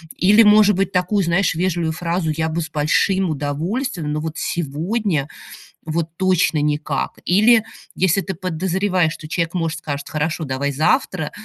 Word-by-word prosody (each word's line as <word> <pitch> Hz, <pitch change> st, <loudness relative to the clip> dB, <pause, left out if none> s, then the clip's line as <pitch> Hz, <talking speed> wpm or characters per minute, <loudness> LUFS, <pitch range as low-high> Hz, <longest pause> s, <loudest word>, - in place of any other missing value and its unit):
Или, 205 Hz, +4 st, +5 dB
может 210 Hz, -1 st, +6 dB
быть, 195 Hz, +1 st, 0 dB
такую, 185 Hz, +2 st, +1 dB
знаешь, 170 Hz, +3 st, +1 dB
вежливую 170 Hz, -2 st, 0 dB
фразу: 170 Hz, -1 st, -2 dB
"Я 160 Hz, 0 st, -1 dB
бы 170 Hz, +2 st, -2 dB
с 155 Hz, -, -7 dB
большим 175 Hz, +5 st, +1 dB
удовольствием, 155 Hz, -, -3 dB
но 150 Hz, -, -2 dB
вот 160 Hz, 0 st, -5 dB
сегодня, 170 Hz, +1 st, -2 dB, 0.6 s
вот 160 Hz, +1 st, -1 dB
точно 185 Hz, -4 st, +2 dB
никак!". 150 Hz, +1 st, -1 dB
Или 215 Hz, +5 st, +5 dB, 0.3 s
если 190 Hz, +1 st, +2 dB
ты 190 Hz, -, -4 dB
подозреваешь, 185 Hz, 0 st, 0 dB
что 155 Hz, -1 st, -10 dB
человек, 170 Hz, 0 st, -1 dB
может, 165 Hz, -2 st, -2 dB
скажет: 140 Hz, -2 st, -5 dB
"Хорошо, 160 Hz, +2 st, -2 dB
давай 140 Hz, +1 st, -2 dB
завтра", 160 Hz, -, 0 dB
170 Hz, 150 wpm, -20 LUFS, 155-190 Hz, 0.6 s, может